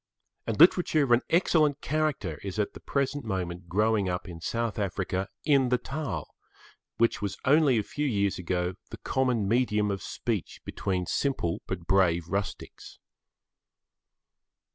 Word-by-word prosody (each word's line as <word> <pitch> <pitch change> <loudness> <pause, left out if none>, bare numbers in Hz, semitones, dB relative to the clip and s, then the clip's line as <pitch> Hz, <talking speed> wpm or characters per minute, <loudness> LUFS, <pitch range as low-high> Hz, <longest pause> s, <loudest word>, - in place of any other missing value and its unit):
And 115 - -2
literature 170 -2 +5
of 130 - -1
an 120 +1 +5
excellent 155 -4 +3
character 155 -1 -1
is 100 0 -5
at 105 -1 -1
the - - -10
present 140 0 -1
moment 90 -4 -4
growing 105 +1 +2
up 90 +1 -3
in 85 -2 -9
South 115 +3 -2
Africa 95 -1 -2 0.2
in 140 -4 +4
the 125 - +3
Taal, 130 - -5 0.6
which 115 -1 +2
was 100 -1 -3
only 140 -2 +5
a 110 - +1
few 150 +8 -3
years 100 -6 0
ago, 90 0 -1 0.2
the - - -8
common 125 -6 0
medium 105 -2 +2
of 100 - -3
speech 110 -7 -4
between 90 -2 -2
simple 90 -8 -1
but 90 -3 -4
brave 85 -3 +2
rustics. 100 +1 -5
105 Hz, 145 wpm, -28 LUFS, 95-135 Hz, 0.6 s, literature